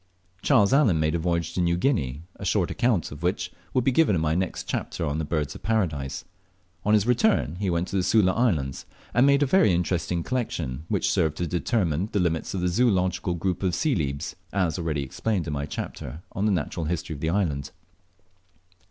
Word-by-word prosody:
Charles 105 +2 +4
Allen 115 - +4
made 80 0 +1
a 85 - 0
voyage 85 0 -1
to 90 - 0
New 85 0 +2
Guinea, 80 - 0
a - - -9
short 95 -1 +1
account 115 -8 +1
of 70 +1 -9
which 90 +5 -1 0.2
will 130 - +1
be 135 - +3
given 135 - +3
in 80 - 0
my 80 0 +1
next 90 +2 -1
chapter 85 - -3
on 75 +1 -1
the - - -1
Birds 75 -1 -2
of - - -11
Paradise. 80 -12 -1 0.6
On 105 +1 +4
his 105 -1 +3
return 125 - +2
he 100 0 -1
went 85 +1 0
to 100 - -1
the - - +3
Sula 95 0 +4
Islands, 85 - 0 0.3
and 125 +4 +5
made 140 +1 +5
a - - +3
very 160 - +4
interesting 85 0 0
collection 80 - -3
which - - +1
served 80 -1 +1
to 90 - -1
determine 90 - 0
the 100 - +2
limits 85 0 -1
of 95 - -2
the 90 - +1
zoological 90 -3 +1
group 90 +1 -2
of 95 -3 0
Celebes, 80 - -1 0.2
as 90 -5 0
already 80 -4 -1
explained 90 +7 -2
in 75 - -3
my 70 0 -3
chapter 80 +2 -6
on 100 +3 -1
the - - +3
natural 85 -2 -2
history 85 0 -2
of 70 - -8
that 80 - 0
island. 80 -7 0
90 Hz, 205 wpm, -26 LUFS, 80-105 Hz, 0.6 s, and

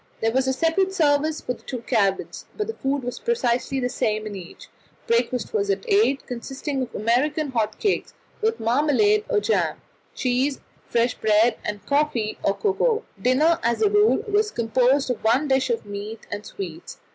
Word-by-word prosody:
There 225 - +1
was 265 +2 +1
a 265 - +2
separate 370 +7 +1
service 310 -2 +2
for 250 - -2
the - - -15
two 250 -3 -6
cabins, 195 -4 0
but 425 - -1
the 450 - -4
food 275 - -2
was 245 0 -4
precisely 270 - 0
the 250 - 0
same 215 -3 -1
in 210 -1 -5
each. 180 -2 -10 0.4
Breakfast 240 - 0
was 410 -2 0
at 400 - -1
eight, 400 - +2
consisting 270 +3 -4
of 250 - -5
American 275 +7 +1
hot 220 -3 -1
cakes, 410 - -1 0.3
with 445 +1 0
marmalade 300 - +2
or - - +3
jam, 450 - 0 0.4
cheese, 260 +2 0 0.3
fresh 235 0 +1
bread, 220 +2 +3
and 210 -1 -5
coffee 280 -7 0
or 195 - +1
cocoa. 440 +3 +1 0.2
Dinner 300 +7 +3
as 235 - +1
a 415 - +3
rule 415 +1 +4
was 420 +1 +2
composed 255 - +2
of 245 - -5
one 245 +7 +3
dish 265 -1 +2
of 230 -2 -1
meat 205 +2 -7
and 205 0 -5
sweets. 180 -5 -7
260 Hz, 180 wpm, -23 LUFS, 230-325 Hz, 0.4 s, rule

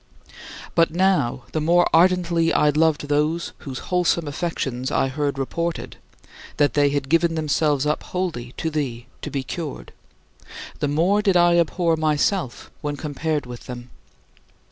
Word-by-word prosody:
17. - - -21 0.4
But 165 -1 +4
now, 165 -9 +1
the 155 - -1
more 175 +3 +4
ardently 170 -1 +3
I 150 - +3
loved 150 0 +2
those 150 +3 0
whose 135 -3 -7 0.2
wholesome 175 -2 +2
affections 135 -5 -3
I 135 - +1
heard 140 0 -2
reported 170 +5 -3 0.6
that 145 -4 +3
they 145 -1 +3
had 140 -1 -2
given 165 +2 +2
themselves 150 -2 +1
up 150 +1 0
wholly 160 -10 -4
to 160 - -2
thee 130 -6 -3 0.2
to - - -5
be 135 -2 -3
cured 155 +3 -6 0.9
the - - 0
more 170 +8 +2
did 195 -3 +3
I 175 0 +5
abhor 170 0 +1
myself 155 - 0
when 145 0 -3
compared 150 0 -2
with 120 -1 -10
them. 125 0 -8
155 Hz, 150 wpm, -22 LUFS, 140-170 Hz, 0.9 s, I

